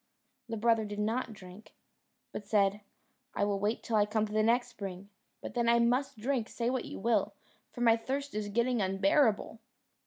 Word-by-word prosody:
The 225 - -3
brother 225 0 +3
did 205 -1 -6
not 225 +3 -1
drink, 195 +1 -13 0.6
but 205 - -7
said, 200 -1 +2 0.5
"I 205 - +1
will 200 -1 -1
wait 210 +3 -1
till 225 - 0
I 210 0 +3
come 215 0 0
to 210 - -8
the 215 - +3
next 235 +3 +2
spring, 195 0 -8 0.3
but - - -7
then 235 -1 +1
I 235 - +5
must 250 +3 +1
drink, 240 0 -1
say 235 +1 -1
what 260 -1 -2
you - - -7
will, 230 +3 +1 0.4
for 245 - -8
my 230 -1 +5
thirst 275 +5 -4
is 210 -1 -3
getting 235 +2 +1
unbearable." 200 +4 +2
220 Hz, 190 wpm, -31 LUFS, 205-235 Hz, 0.6 s, I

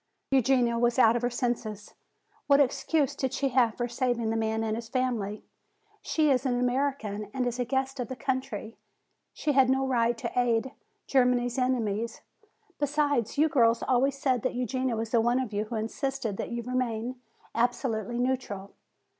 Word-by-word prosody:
"Eugenia 250 -3 +3
was 240 +1 +2
out 230 -2 +6
of 240 - 0
her 245 - +1
senses. 240 -4 -3 0.5
What 280 -1 +5
excuse 285 +1 +1
did 265 -1 -2
she 275 0 0
have 245 -3 +3
for 240 - -2
saving 240 -2 -1
the - - -1
man 220 0 0
and 220 -1 -1
his 230 0 -6
family? 230 -5 -1 0.6
She 305 -2 +2
is 260 -1 +2
an 250 -3 0
American 245 -5 -1
and 255 -1 0
is 245 0 -2
a 245 - +1
guest 265 +1 -1
of 245 - -2
the 260 - -5
country. 260 -5 -3 0.6
She 305 - -1
had 265 -2 +4
no 265 0 +2
right 240 -2 +1
to - - -4
aid 245 0 +1 0.3
Germany's 250 -1 +2
enemies. 235 -3 -1 0.6
Besides, 290 -5 0
you 305 +2 +5
girls 235 -5 +3
always 265 +2 +2
said 260 -4 +1
that 255 - -2
Eugenia 255 0 -1
was 225 0 -3
the 235 - +4
one 240 +2 +2
of 250 -5 -3
you 205 +1 -1
who 230 +2 -6
insisted 230 +1 -2
that - - -4
you 235 0 -4
remain 250 0 -2 0.4
absolutely 240 -2 -1
neutral." 245 -6 -2
245 Hz, 175 wpm, -28 LUFS, 230-265 Hz, 0.6 s, out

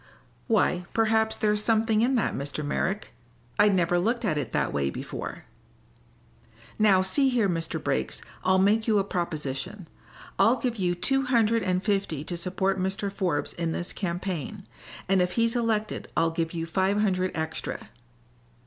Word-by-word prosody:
"Why, 180 -6 +2
perhaps 220 0 +2
there's 210 0 +1
something 220 -1 +2
in 255 +3 +2
that, 230 - +1
Mr. 140 +2 -4
Merrick. 195 +7 -2 0.5
I'd 205 -1 +5
never 175 -1 +2
looked 235 +5 0
at 185 - +1
it 140 -6 -3
that - - 0
way 70 -1 0
before." - - -6 1.3
"Now, 195 -3 +5
see 270 +9 +3
here, 240 -5 +2
Mr. 165 -3 -2
Briggs. 65 0 -2 0.2
I'll 185 +1 +4
make 210 +4 +3
you 215 -2 +4
a 200 - +3
proposition. 165 -1 -4 0.5
I'll 230 - +5
give 245 -2 -2
you 180 -3 0
two 270 +9 +1
hundred 230 -2 +3
and 185 -1 0
fifty 195 -8 -1
to 175 - -4
support 190 +2 -1
Mr. 195 +1 -2
Forbes 180 -8 -1
in 165 -1 -2
this 175 - -4
campaign, 185 +1 -4 0.4
and 190 -1 +3
if 180 0 0
he's 230 +2 +1
elected 225 -3 -1
I'll 165 0 +3
give 165 0 -2
you 165 -1 -2
five 190 +5 +1
hundred 185 -3 +1
extra." 160 -8 -4
190 Hz, 160 wpm, -27 LUFS, 170-220 Hz, 1.3 s, I'd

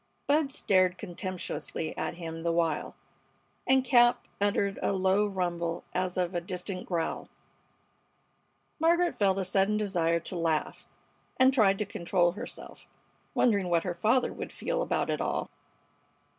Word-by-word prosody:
Bud 290 -1 +2
stared 185 -6 +2
contemptuously 180 -4 -5
at - - -3
him 165 -1 -6
the 170 0 0
while, 165 -2 0 0.7
and 265 0 +4
Cap 240 -1 +4
uttered 200 -1 +1
a - - +1
low 190 +2 +2
rumble 175 -3 -2
as 185 0 -1
of 180 0 0
a 175 - -1
distant 180 +1 -5
growl. 170 -3 -2 1.5
Margaret 340 +2 +3
felt 195 -2 +2
a 190 - -1
sudden 195 +3 +2
desire 170 -5 +1
to 170 - -6
laugh, 165 -2 -1 0.5
and 260 +1 +5
tried 200 -6 +4
to 210 - -1
control 175 -2 +1
herself, 225 +7 -9 0.5
wondering 200 -7 +2
what 170 -1 +2
her 180 - -2
father 225 +8 +1
would - - -6
feel - - -2
about - - 0
it - - -1
all. - - -2
190 Hz, 145 wpm, -29 LUFS, 175-210 Hz, 1.5 s, and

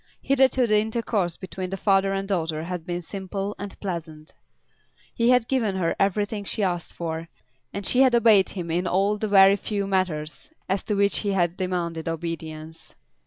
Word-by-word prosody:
Hitherto 265 -2 +3
the 215 -2 +3
intercourse 215 -5 -1
between 185 -1 -6
the 195 - -4
father 195 -1 +2
and 195 0 -2
daughter 160 -5 -1
had 180 0 -5
been 175 0 -3
simple 195 +2 -4
and 200 -1 -7
pleasant. 160 -5 -6 0.8
He 235 +1 +2
had 250 -2 +4
given 225 -7 0
her 175 -3 0
everything 205 +2 0
she 205 +1 -1
asked 175 -3 -2
for, 165 -1 -4 0.4
and 200 0 -5
she 255 - +3
had 260 -2 +5
obeyed 220 -4 +5
him 175 -4 -5
in 175 +2 0
all 200 +4 +1
the 215 - -1
very 195 -1 +6
few 200 0 -2
matters 185 - -2 0.2
as 195 0 -1
to 210 - 0
which 200 0 +2
he 205 -2 -1
had 175 -2 +1
demanded 175 -3 -2
obedience. 160 -1 -6
195 Hz, 175 wpm, -25 LUFS, 170-205 Hz, 0.8 s, very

